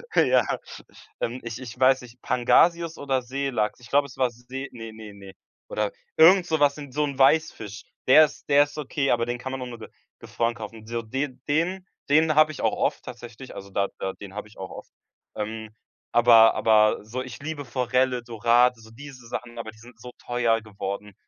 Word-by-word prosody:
Ja. - - +4 0.8
Ähm, 125 +2 -3
ich 115 +1 -6
ich 125 -1 -9
weiß 130 0 +4
nicht, 125 0 -15
Pangasius 165 +7 +2
oder 135 -2 -1
Seelachs? 125 -4 -2
Ich 120 - -14
glaub, 140 0 +3
es 130 - -12
war 130 -2 +2
See 125 +3 -8
ne 115 -2 -9
ne 110 -2 -11
ne. 100 -1 -12 0.4
Oder 105 -1 -1 0.3
irgend 175 +3 +7
so 160 -3 0
was 145 0 +3
in 145 -3 -9
so 150 - +1
'n 140 -2 -5
Weißfisch. 135 -8 +2 0.2
Der 155 +4 +8
ist 150 - -11
der 145 0 +6
ist 145 +1 -9
okay, 140 -1 -1
aber 115 -1 +2
den 120 0 -3
kann 130 +2 -6
man 135 -1 -5
auch - - -4
nur 120 -1 -9
ge - - -10 0.3
gefroren 115 0 -2
kaufen. 110 0 -9
So 115 0 -3
den 130 +3 -4
den 180 +5 0 0.2
den 155 +1 +4
hab 155 0 +6
ich 150 - -8
auch - - +1
oft - - -1
tatsächlich, 120 +2 -10
also 100 0 -9
da 100 0 0
da 95 - -3
den 100 -1 -11
hab 105 - -5
ich 105 - -20
auch 95 -1 -7
oft. - - -11 0.4
Ähm, 110 +1 -5 0.4
aber 115 -1 +7
aber 110 -1 +3
so 120 +4 -5
ich 130 0 -8
liebe 150 -1 -5
Forelle, 125 0 0
Dorade, 120 +1 +2
so 110 0 -16
diese 130 -1 -12
Sachen, 120 0 -6
aber 110 -1 -6
die 110 - -21
sind 115 0 -16
so 125 +1 -10
teuer 120 -2 +1
geworden. 100 -1 -6
125 Hz, 205 wpm, -25 LUFS, 110-140 Hz, 0.8 s, Der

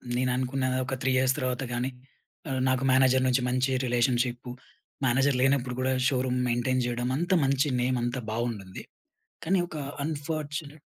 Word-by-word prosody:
నేను 125 0 +1
అనుకున్న 130 +1 -1 0.2
ఒక 130 - -4
3 130 - +1
ఇయర్స్ 130 0 +2
తర్వాత 130 +1 -1
గానీ 125 +2 -1 0.6
ఆహ్, 130 -1 -1
నాకు 130 +1 +1
మేనేజర్ 130 0 +4
నుంచి 125 0 +2
మంచి 130 +1 +1
రిలేషన్‌షిప్పు. 120 0 0 0.5
మేనేజర్ 135 +2 +3
లేనప్పుడు 135 -2 +2
కూడా 130 +1 +1
షోరూమ్ 125 -1 0
మెయింటైన్ 125 +2 +1
చేయడం. 120 +1 -2
అంతా 175 +3 +1
మంచి 140 +2 +2
నేమ్ 125 0 +1
అంతా 120 +1 -2
బావుండుంది. 110 -5 -4 0.6
కానీ 185 +3 +2
ఒక 155 - -8 0.3
అన్ఫార్చునేట్ 150 0 -4
130 Hz, 150 wpm, -27 LUFS, 125-135 Hz, 0.6 s, మేనేజర్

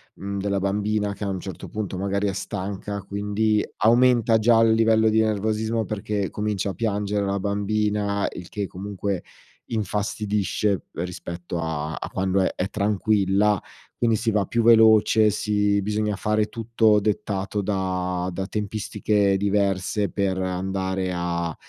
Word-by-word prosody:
mhmm, 100 0 -5
della 100 0 0
bambina 105 +1 0
che 100 - -6
a 100 - -2
un 95 - -2
certo 95 - -7
punto 100 -3 -4
magari 100 +1 -1
è - - -3
stanca 100 +1 -4
quindi, 105 +2 0
aumenta 120 0 +4
già 115 +1 +5
il 115 - +5
livello 110 0 +4
di 110 0 +3
nervosismo 110 +1 0
perché 105 -1 -2
comincia 105 -2 -2
a - - -7
piangere 105 -2 -1
la 100 0 -1
bambina, 100 0 0
il 90 -1 -8
che 100 -2 -3
comunque 100 0 -4 0.4
infastidisce 105 -2 -1
p - - -29
rispetto 85 0 -5
a 80 -1 -3
a - - -6
quando 95 +1 0
è - - +1
è 95 - -2
tranquilla, 105 -1 +2 0.4
quindi 115 -2 +2
si 115 - 0
va 105 -2 +1
più 115 +5 0
veloce, 110 -1 +6
si 105 -1 +1
bisogna 105 +1 -1
fare 105 +1 +1
tutto 110 -1 +2
dettato 100 -1 -1
da 90 -2 -1
da 95 +2 -3
tempistiche 105 -1 0
diverse 100 0 0
per 95 -2 -1
andare 95 0 -2
a, 85 -1 -2
100 Hz, 145 wpm, -24 LUFS, 95-105 Hz, 0.4 s, veloce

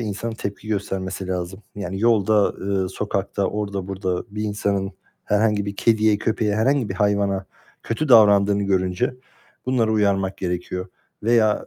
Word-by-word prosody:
insanın 110 +1 -3
tepki 100 0 -6
göstermesi 95 -2 -3
lazım. 90 +2 -4
Yani 95 -1 -4
yolda, 110 -2 +3 0.3
eee, 95 - -2
sokakta, 100 0 -2
orada 100 -2 -3
burada 95 -2 -2
bir 105 - -3
insanın 100 -2 -1 0.3
herhangi 105 -1 +1
bir 100 0 -5
kediye, 110 -2 +3
köpeğe, 105 -1 0
herhangi 130 +1 +2
bir 95 - -4
hayvana 100 -1 +1 0.4
kötü 130 +7 -2
davrandığını 100 -4 +6
görünce, 95 +4 0 0.5
bunları 120 -4 +2
uyarmak 100 -3 +1
gerekiyor. 90 +1 -3 0.3
Veya, 110 -1 +3
100 Hz, 135 wpm, -22 LUFS, 95-110 Hz, 0.5 s, davrandığını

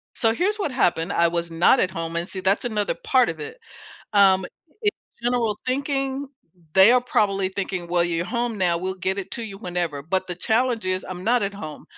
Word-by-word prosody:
So, 225 -2 +2
here's 395 - 0
what 345 -9 -2
happened, 170 -9 +1
I 170 - +3
was 170 0 -2
not 170 +10 +4
at 185 - +2
home, 165 -2 -5
and 170 +1 -2
see 190 - -5
that's 195 +4 +1
another 210 -4 0
part 255 -2 +2
of - - -5
it, 445 +2 -7 0.6
um, 190 -2 +5 0.4
in 420 - +3 0.3
general 235 -3 0
thinking, 270 +1 -1 0.5
they 190 +5 +7
are 250 - +5
probably 195 -5 +1
thinking, 190 -2 -4
"Well, 175 0 +2
you're 170 0 -1
home 235 -1 -2
now, 175 -2 +2
we'll 185 +1 -3
get 190 +1 -2
it 195 -1 -5
to 235 - -3
you 200 -3 -7
whenever," 175 -7 -3
but 185 +5 -1
the 180 - -4
challenge 225 +4 +1
is 185 0 -1
I'm 180 -1 -6
not 240 0 +3
at 200 0 -3
home, 155 -7 -8
195 Hz, 210 wpm, -23 LUFS, 180-240 Hz, 0.6 s, they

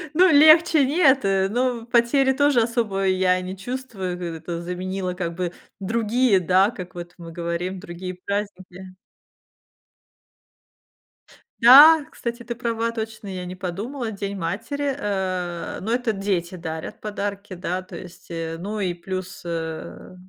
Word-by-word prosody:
Ну, 370 +1 +6
легче 310 0 +7
нет, 275 - +3
э, 195 0 +2
но 240 0 -1
потери 260 +3 +3
тоже 285 -2 +3
особо 225 -4 -1
я 185 -1 +2
не 185 +1 -6
чувствую, 205 -5 -5
в 180 - -10
это 170 0 -5
заменило 185 +1 -4
как 170 -2 -3
бы 175 0 -3 0.3
другие, 225 +1 +2
да, 185 +3 +3
как 185 -6 -9
вот 175 0 -9
мы 165 -1 -10
говорим, 170 +2 -3
другие 185 -1 -7
праздники. 185 -1 -6 2.7
Да, 290 +6 +9
кстати, 235 0 -5
ты 235 +1 -5
права 230 -1 -2
точно, 220 -2 -6
я 185 -2 -5
не 180 - -7
подумала, 215 +7 -4
День 200 -1 -5
матери, 230 - -2
э, 185 -6 -3
но 225 +4 -2
это 245 -2 0
дети 195 -3 -2
дарят 160 -2 -6
подарки, 205 -1 -5
да, 180 0 -3
то 185 - -12
есть, 180 -2 -11
э, 165 -1 -4
ну, 210 +3 -4
и 180 -3 -1
плюс, 185 +1 -6
э, 165 +2 -6
195 Hz, 140 wpm, -23 LUFS, 180-235 Hz, 2.7 s, Да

